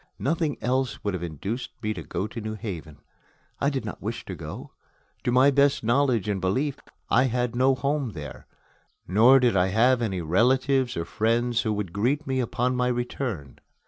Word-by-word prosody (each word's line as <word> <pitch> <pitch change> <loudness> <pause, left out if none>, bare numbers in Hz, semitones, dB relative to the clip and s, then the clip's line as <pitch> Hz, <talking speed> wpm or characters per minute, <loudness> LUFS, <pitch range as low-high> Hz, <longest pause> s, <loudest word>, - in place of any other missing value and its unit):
Nothing 155 +1 -1
else 130 0 -1
would 100 - -1
have 90 - -3
induced 90 - -5
me 110 0 0
to 90 - -7
go 95 - -3
to 115 +2 -6
New 110 0 -4
Haven. 85 -8 -7 0.6
I 140 - +2
did 135 -5 -3
not 105 - -6
wish 115 +4 -4
to 95 - -6
go. 80 -2 -8 0.5
To 120 - +2
my 130 +3 +5
best 140 -1 +3
knowledge 120 -3 +2
and 100 -3 -1
belief, 130 +10 0 0.3
I 125 +3 +5
had 125 -1 -1
no 130 +2 +3
home 140 -3 -1
there, 75 -5 -9 0.6
nor 115 +9 +6
did 125 -4 +2
I 90 -1 +3
have 120 +6 +3
any 100 -5 -1
relatives 130 - +2
or 85 - -2
friends 115 +5 +1
who 110 -3 -1
would 100 -5 -4
greet 130 +9 0
me 130 -1 -1
upon 125 +1 0
my 125 0 +1
return. 120 - -3
120 Hz, 185 wpm, -26 LUFS, 100-130 Hz, 0.6 s, nor